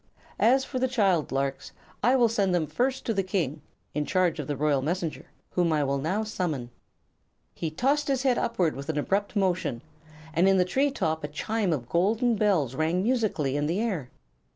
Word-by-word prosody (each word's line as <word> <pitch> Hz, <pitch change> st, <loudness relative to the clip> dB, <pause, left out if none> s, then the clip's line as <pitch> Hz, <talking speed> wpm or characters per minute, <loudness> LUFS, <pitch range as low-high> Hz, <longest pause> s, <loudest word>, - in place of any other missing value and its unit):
As 265 Hz, +4 st, +4 dB
for 255 Hz, -, -4 dB
the 260 Hz, -, +2 dB
child 195 Hz, -, +1 dB
larks, 135 Hz, 0 st, -2 dB, 0.3 s
I 250 Hz, +2 st, +4 dB
will 245 Hz, -3 st, +5 dB
send 200 Hz, -5 st, +1 dB
them 165 Hz, -3 st, +1 dB
first 255 Hz, -, -1 dB
to 225 Hz, -, 0 dB
the 195 Hz, -, +1 dB
King, 170 Hz, -6 st, -2 dB, 0.3 s
in 150 Hz, -, 0 dB
charge 180 Hz, 0 st, +1 dB
of 145 Hz, -, -4 dB
the 145 Hz, -, -2 dB
Royal 145 Hz, -1 st, +2 dB
Messenger, 165 Hz, +2 st, -3 dB, 0.2 s
whom 175 Hz, -2 st, +1 dB
I 150 Hz, -2 st, +2 dB
will 140 Hz, 0 st, 0 dB
now 185 Hz, +10 st, -1 dB
summon." 160 Hz, -, -3 dB, 0.8 s
He 165 Hz, -, -3 dB
tossed 275 Hz, -, +1 dB
his 270 Hz, -2 st, 0 dB
head 255 Hz, -3 st, +2 dB
upward 185 Hz, -9 st, 0 dB
with 140 Hz, +3 st, -7 dB
an 155 Hz, -, -1 dB
abrupt 200 Hz, +8 st, -1 dB
motion, 185 Hz, -, 0 dB, 0.5 s
and 175 Hz, +4 st, +4 dB
in 195 Hz, -, +4 dB
the 180 Hz, -, +4 dB
tree 270 Hz, +10 st, +1 dB
top 160 Hz, -, -2 dB
a -, -, -1 dB
chime 200 Hz, +6 st, -1 dB
of 130 Hz, -7 st, -2 dB
golden 220 Hz, -, +2 dB
bells 190 Hz, -, +1 dB
rang 160 Hz, +6 st, 0 dB
musically 215 Hz, -, 0 dB
in 145 Hz, 0 st, 0 dB
the 170 Hz, +5 st, 0 dB
air. 190 Hz, -, -2 dB
180 Hz, 200 wpm, -27 LUFS, 150-225 Hz, 0.8 s, will